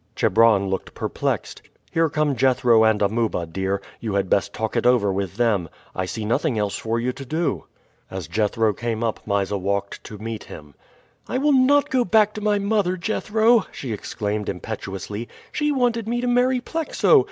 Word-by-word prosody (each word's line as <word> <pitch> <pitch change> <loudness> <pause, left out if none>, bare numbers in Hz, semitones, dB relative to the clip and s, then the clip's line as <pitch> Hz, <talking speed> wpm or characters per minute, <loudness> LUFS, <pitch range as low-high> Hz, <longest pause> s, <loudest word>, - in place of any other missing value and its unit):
Chebron 110 -1 +4
looked 95 0 -4
perplexed. - - -3 0.3
"Here 165 -1 +2
come 150 -2 0
Jethro 125 -2 +4
and 110 -2 +3
Amuba, 110 -4 0
dear. 95 +4 -2 0.2
You 110 -3 -3
had 100 -2 0
best 100 - +2
talk 110 +1 -3
it 120 0 +2
over 110 -6 +3
with 95 0 -3
them. 105 -8 +1 0.2
I 95 - -2
see 110 +2 -4
nothing 125 +3 0
else 105 -2 -1
for 115 +1 -2
you 125 +2 0
to 135 - -9
do." 160 +5 -2 0.4
As 95 -5 -6
Jethro 110 +2 +1
came 115 +2 -3
up 115 -2 -1
Mysa 100 0 0
walked 100 +1 -2
to 105 - -8
meet 110 +1 -6
him. 75 -1 -11 0.5
"I - - -1
will 290 +2 +3
not 275 +2 +4
go 255 -2 +3
back 210 0 +3
to 215 - -6
my 210 0 +2
mother, 200 -2 +1
Jethro!" 220 +4 +2
she 125 -5 -5
exclaimed 105 0 -3
impetuously. 100 +4 -5 0.2
"She 295 0 0
wanted 240 -5 +1
me 240 +1 0
to 245 - -1
marry 250 +1 +2
Plexo. 325 - +3
115 Hz, 180 wpm, -23 LUFS, -, 0.5 s, Chebron